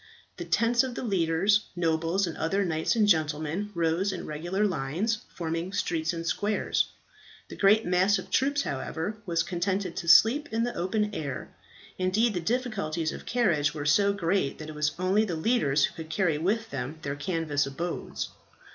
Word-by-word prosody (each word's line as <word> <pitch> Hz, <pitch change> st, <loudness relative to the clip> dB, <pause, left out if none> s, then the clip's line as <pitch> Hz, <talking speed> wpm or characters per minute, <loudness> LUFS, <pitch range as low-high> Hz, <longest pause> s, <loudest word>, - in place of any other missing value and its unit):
The -, -, -5 dB
tents 235 Hz, +1 st, +3 dB
of 260 Hz, -2 st, -3 dB
the -, -, -4 dB
leaders, 195 Hz, 0 st, +2 dB
nobles, 165 Hz, +2 st, +1 dB
and 170 Hz, -, -5 dB
other 195 Hz, +5 st, 0 dB
knights 160 Hz, +2 st, 0 dB
and 215 Hz, -2 st, +3 dB
gentlemen, 160 Hz, +2 st, +1 dB
rose 170 Hz, +4 st, +1 dB
in 185 Hz, -, -5 dB
regular 175 Hz, +7 st, -1 dB
lines, 185 Hz, +6 st, -1 dB, 0.2 s
forming 165 Hz, +1 st, -3 dB
streets 165 Hz, -4 st, 0 dB
and 165 Hz, -1 st, -5 dB
squares. 205 Hz, +5 st, 0 dB, 0.6 s
The -, -, -8 dB
great 210 Hz, +3 st, +4 dB
mass 185 Hz, +3 st, +3 dB
of -, -, -8 dB
troops, 280 Hz, +2 st, +2 dB
however, 160 Hz, +9 st, -3 dB
were 170 Hz, -, -3 dB
contented 180 Hz, +2 st, -1 dB
to 170 Hz, -, -4 dB
sleep 225 Hz, -, +6 dB
in 225 Hz, +1 st, 0 dB
the 240 Hz, -, -1 dB
open 210 Hz, +4 st, -1 dB
air; 140 Hz, -8 st, -4 dB, 0.5 s
indeed 210 Hz, +5 st, +2 dB
the 180 Hz, -, -1 dB
difficulties 175 Hz, -7 st, -1 dB
of -, -, -9 dB
carriage 170 Hz, -12 st, +1 dB
were 145 Hz, -1 st, -4 dB
so 200 Hz, +6 st, +4 dB
great 185 Hz, -6 st, 0 dB
that 155 Hz, -1 st, -8 dB
it -, -, -7 dB
was 150 Hz, 0 st, 0 dB
only 185 Hz, +4 st, +2 dB
the 180 Hz, -6 st, -2 dB
leaders 155 Hz, -, +2 dB
who -, -, -7 dB
could 160 Hz, -1 st, -8 dB
carry 160 Hz, -2 st, +1 dB
with 220 Hz, +7 st, -1 dB
them 135 Hz, +4 st, -4 dB
their 140 Hz, 0 st, -3 dB
canvas 150 Hz, -3 st, -1 dB
abodes. 170 Hz, +6 st, -4 dB
175 Hz, 175 wpm, -28 LUFS, 160-205 Hz, 0.6 s, sleep